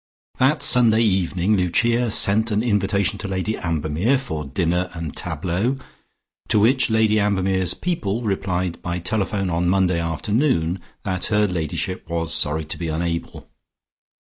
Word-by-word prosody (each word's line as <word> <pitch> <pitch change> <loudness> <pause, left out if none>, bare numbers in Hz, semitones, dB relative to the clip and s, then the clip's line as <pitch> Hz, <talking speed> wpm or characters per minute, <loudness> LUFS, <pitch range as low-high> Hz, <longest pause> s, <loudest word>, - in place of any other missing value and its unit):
That 135 +4 +3
Sunday 115 -2 +4
evening 95 -1 +1
Lucia 115 +6 +1
sent 110 +1 +3
an 105 0 0
invitation 100 -3 +1
to 100 - -5
Lady 95 +3 -2
Ambermere 85 - 0
for 80 - -5
"dinner 85 +6 -1
and 85 -3 -5
tableaux," 95 +9 -2 0.7
to 105 - +3
which 125 +6 +3
Lady 110 -1 +3
Ambermere's 95 -3 +1
"people" 120 - -2
replied 95 -4 -2
by 85 0 -3
telephone 100 0 -1
on 85 +1 0
Monday 90 -2 +2
afternoon 85 - 0 0.2
that 95 -2 -2
her 105 -1 +2
ladyship 90 0 -3
was 85 -1 -1
sorry 75 +1 0
to 75 - -5
be 85 - -3
unable. 85 +1 -3
95 Hz, 140 wpm, -22 LUFS, 85-110 Hz, 0.7 s, Sunday